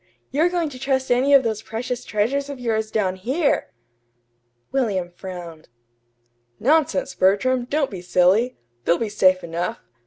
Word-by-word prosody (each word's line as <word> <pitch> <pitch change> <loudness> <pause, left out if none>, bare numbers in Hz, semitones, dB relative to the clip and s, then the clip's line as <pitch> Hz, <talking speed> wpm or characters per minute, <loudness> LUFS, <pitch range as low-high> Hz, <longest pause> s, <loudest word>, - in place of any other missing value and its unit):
You're 315 +6 +3
going 345 -3 -1
to 255 -3 -10
trust 265 -1 0
any 255 +3 +3
of 270 - +6
those 220 -2 -2
precious 240 +3 -4
treasures 270 +7 -1
of 280 -2 -6
yours 220 -3 -1
down 195 -4 0
here!" 270 - 0 1.0
William 200 -10 0
frowned. 175 -4 -9 0.9
"Nonsense, 280 -1 +2
Bertram, 240 +7 +2
don't 280 +1 0
be 190 -3 -6
silly! 185 +7 +2 0.3
They'll 170 - +3
be 225 - -2
safe 185 -3 +3
enough. 175 +7 -3
230 Hz, 145 wpm, -22 LUFS, 190-270 Hz, 1.0 s, of